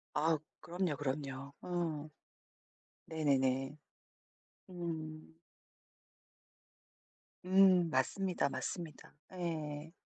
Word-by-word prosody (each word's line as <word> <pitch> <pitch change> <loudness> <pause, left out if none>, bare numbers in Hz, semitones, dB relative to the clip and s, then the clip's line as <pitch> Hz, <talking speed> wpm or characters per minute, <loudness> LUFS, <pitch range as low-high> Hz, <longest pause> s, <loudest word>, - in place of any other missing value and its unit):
아 160 +1 +4 0.2
그럼요 175 -2 -1
그럼요 140 0 -3
어. 165 -4 -2 1.0
네네네. 135 -3 +2 1.0
음. 160 -2 -5 2.1
음 185 -2 +6
맞습니다 160 +4 +1
맞습니다. 165 -2 -5 0.2
예. 160 -4 -3
155 Hz, 130 characters per minute, -35 LUFS, 145-175 Hz, 2.1 s, 음